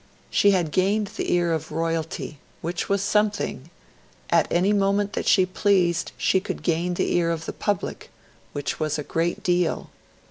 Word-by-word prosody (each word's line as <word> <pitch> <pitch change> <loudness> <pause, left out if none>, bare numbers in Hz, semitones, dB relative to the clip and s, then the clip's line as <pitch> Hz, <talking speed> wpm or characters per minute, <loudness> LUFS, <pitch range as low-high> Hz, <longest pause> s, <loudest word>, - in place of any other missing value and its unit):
She 205 - +4
had 180 -6 +2
gained 200 +3 +1
the - - -2
ear 175 -1 +2
of 160 -1 -3
Royalty 165 -2 -3 0.2
which 170 +2 -3
was 200 0 +1
something; 205 -8 0 0.6
at - - +3
any 185 +4 +3
moment 200 0 +1
that - - -3
she 185 - +5
pleased 185 -3 +1
she 190 - +3
could 185 - -6
gain 175 +1 0
the - - 0
ear 170 -1 +2
of 165 -1 -2
the - - -4
public 205 -4 -3 0.4
which 145 -1 -3
was 155 -1 0
a 150 - -3
great 165 +4 -1
deal. 175 -2 0
175 Hz, 170 wpm, -24 LUFS, 165-200 Hz, 0.6 s, she